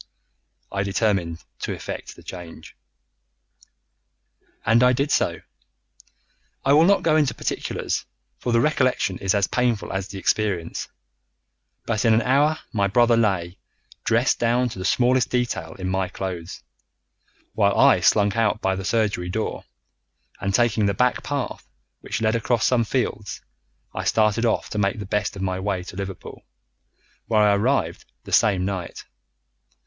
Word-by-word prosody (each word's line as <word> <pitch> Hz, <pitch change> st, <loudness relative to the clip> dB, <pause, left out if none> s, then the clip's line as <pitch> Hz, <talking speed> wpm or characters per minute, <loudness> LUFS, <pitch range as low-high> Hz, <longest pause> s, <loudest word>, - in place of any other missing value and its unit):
I 100 Hz, -, -1 dB
determined 95 Hz, -5 st, -1 dB, 0.2 s
to -, -, -3 dB
effect -, -, -7 dB
the -, -, -16 dB
change. 90 Hz, -3 st, -10 dB, 1.9 s
"And 115 Hz, +2 st, +4 dB
I 125 Hz, 0 st, +5 dB
did 140 Hz, +3 st, 0 dB
so. -, -, +1 dB, 1.2 s
I 135 Hz, -, +5 dB
will 155 Hz, +3 st, +6 dB
not 200 Hz, +2 st, +3 dB
go 155 Hz, -2 st, +3 dB
into 150 Hz, -4 st, +2 dB
particulars, -, -, -3 dB, 0.3 s
for 120 Hz, -, -2 dB
the 115 Hz, 0 st, +3 dB
recollection 130 Hz, -10 st, +1 dB
is 95 Hz, +1 st, +1 dB
as 100 Hz, -1 st, +3 dB
painful 120 Hz, -1 st, -1 dB
as 95 Hz, -1 st, -3 dB
the 100 Hz, -, -8 dB
experience; 95 Hz, -4 st, -1 dB, 1.0 s
but 110 Hz, -2 st, -1 dB
in 115 Hz, -2 st, +5 dB
an 115 Hz, -, +2 dB
hour 145 Hz, +5 st, +3 dB, 0.2 s
my 100 Hz, -3 st, +2 dB
brother 120 Hz, +3 st, +4 dB
lay, 95 Hz, -5 st, 0 dB, 0.4 s
dressed 115 Hz, +3 st, +2 dB
down 120 Hz, +2 st, +2 dB
to 95 Hz, -, -8 dB
the 95 Hz, -, -4 dB
smallest 125 Hz, +3 st, +2 dB
detail 95 Hz, -10 st, -2 dB
in 95 Hz, -1 st, -5 dB
my 95 Hz, 0 st, 0 dB
clothes, 90 Hz, -2 st, -6 dB, 0.9 s
while -, -, +2 dB
I -, -, +6 dB
slunk 100 Hz, 0 st, +3 dB
out 115 Hz, -2 st, +1 dB
by 95 Hz, -2 st, 0 dB
the 95 Hz, -, -5 dB
surgery 100 Hz, -4 st, 0 dB
door, 110 Hz, +4 st, -3 dB, 0.7 s
and 100 Hz, -, -1 dB
taking 110 Hz, -1 st, +2 dB
the 100 Hz, -, 0 dB
back 125 Hz, +3 st, +1 dB
path 140 Hz, -3 st, -4 dB, 0.3 s
which 115 Hz, -, -4 dB
led 110 Hz, 0 st, +2 dB
across 115 Hz, 0 st, +1 dB
some 120 Hz, -3 st, +2 dB
fields, 105 Hz, -4 st, -2 dB, 0.5 s
I -, -, -4 dB
started 110 Hz, +2 st, +2 dB
off 110 Hz, -, 0 dB
to 105 Hz, -, -2 dB
make 100 Hz, 0 st, +1 dB
the 105 Hz, -, -5 dB
best 100 Hz, +1 st, -1 dB
of 95 Hz, -, -5 dB
my 95 Hz, -1 st, -1 dB
way 95 Hz, -2 st, -2 dB
to 90 Hz, -, -10 dB
Liverpool, 95 Hz, -1 st, -7 dB, 0.8 s
where 110 Hz, -2 st, +3 dB
I 105 Hz, -1 st, +5 dB
arrived 100 Hz, -5 st, 0 dB, 0.2 s
the -, -, -11 dB
same 95 Hz, -3 st, +3 dB
night. 95 Hz, -3 st, -5 dB
105 Hz, 155 wpm, -23 LUFS, 95-120 Hz, 1.9 s, will